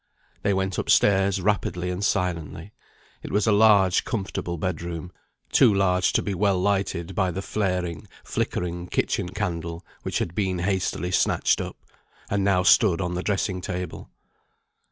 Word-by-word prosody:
They 100 - +1
went 95 -1 -1
up - - -4
stairs 95 -1 +4
rapidly 90 -3 0
and 90 +3 -4
silently. 90 -6 -2 0.5
It - - -8
was 105 +1 +2
a 110 - +3
large, 100 -3 +5
comfortable 95 -6 -3
bedroom; 85 0 -4 0.4
too - - +6
large 90 -2 +2
to - - +2
be 100 - -2
well 95 0 +1
lighted 95 -3 -1
by 95 0 +1
the 95 +3 -4
flaring, 90 -6 -2 0.2
flickering 90 0 -3
kitchen 90 - -1
candle 85 -4 -4 0.2
which - - -2
had 85 - -2
been 95 -1 -1
hastily 90 -1 -1
snatched - - +2
up, - - -6 0.5
and 100 -1 +1
now 95 -2 +3
stood 95 -2 +5
on 90 -2 -2
the 90 - -2
dressing 95 -2 -1
table. 90 0 -5
90 Hz, 155 wpm, -25 LUFS, 90-100 Hz, 0.5 s, too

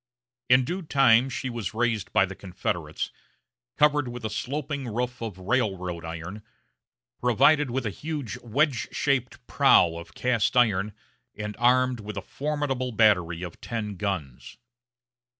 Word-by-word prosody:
In 125 0 +6
due 180 +7 -3
time 135 -5 +4
she 130 - -4
was 120 -4 -4
raised 115 -4 0
by - - +4
the 95 - -7
Confederates, 90 -5 -4 0.7
covered 150 -2 +3
with 120 -1 -6
a 110 - -2
sloping 140 +4 -3
roof 120 +2 -3
of 110 -5 -5
railroad 90 -4 -1
iron, 80 +5 -6 0.8
provided 135 +4 +4
with 125 0 -2
a 105 - -1
huge 145 -2 -5
wedge 135 +2 +1
shaped 130 -3 -1
prow 85 -1 +4
of 85 - -10
cast 125 -1 +1
iron, 105 -4 +3 0.4
and 105 0 -5
armed 125 0 +3
with 105 0 -7
a - - -4
formidable 140 -3 -2
battery 90 -7 +3
of 85 -2 -8
ten 105 -3 -4
guns. 90 -10 -4
115 Hz, 140 wpm, -26 LUFS, 100-130 Hz, 0.8 s, In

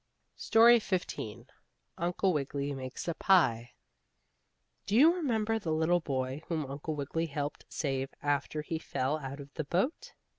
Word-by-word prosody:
STORY 230 +1 +6
XV 120 - -3 0.5
UNCLE 180 +2 +1
WIGGILY 140 -1 -2
MAKES 130 +2 -6
A - - 0
PIE 125 - +3 1.2
Do 200 - 0
you 305 +8 +7
remember 225 -10 0
the 170 -6 -3
little 160 +3 +2
boy 135 -2 -3
whom 160 -3 -1
Uncle 140 +3 -5
Wiggily 155 +3 -2
helped 145 0 -4
save 135 -3 -2
after 145 +1 -1
he 160 +1 -3
fell 145 -1 -1
out 135 0 -6
of 140 0 -11
the 155 - -3
boat? 280 - -1
155 Hz, 145 wpm, -31 LUFS, 140-185 Hz, 1.2 s, you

